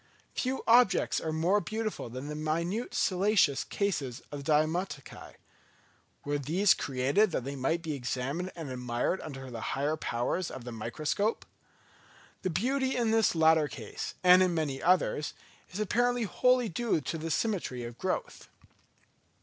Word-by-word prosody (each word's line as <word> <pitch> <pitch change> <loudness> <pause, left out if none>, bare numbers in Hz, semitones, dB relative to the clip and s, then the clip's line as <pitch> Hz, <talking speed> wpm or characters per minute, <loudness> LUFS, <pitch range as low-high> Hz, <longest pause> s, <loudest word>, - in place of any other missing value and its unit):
Few 260 +1 -2
objects 235 -3 +4
are 160 - -2
more 175 +6 +2
beautiful 215 - -4
than 130 +4 -6
the 150 - -4
minute 170 +9 -2
siliceous 185 -6 +3
cases 145 - -2
of 145 -1 -6
the 155 - -1
diatomaceæ: 155 -1 -1 0.9
were 145 0 -1
these 175 +8 +3
created 140 +11 +1
that 145 - -2
they 140 +2 -5
might 160 +6 -1
be 160 -2 -2
examined 140 +7 -3
and 160 -6 -6
admired 125 +7 -1
under 135 -4 -8
the 115 -2 -6 0.2
higher 145 +3 +1
powers 150 +6 -2
of 130 - -8
the 120 - -7
microscope? 150 - -2 1.0
The 185 - -1
beauty 260 - 0
in 235 -3 +1
this 225 -5 +3
latter 160 -1 +5
case, 115 -7 -6
and 180 0 +8
in 180 -2 +2
many 145 -4 -2
others, 175 -4 +2 0.3
is 185 - -7
apparently 245 +4 +1
wholly 250 +4 +2
due 215 0 0
to 165 +2 -4
symmetry 165 - -1
of 120 0 -8
growth. 185 - -3
160 Hz, 150 wpm, -30 LUFS, 140-200 Hz, 1.0 s, and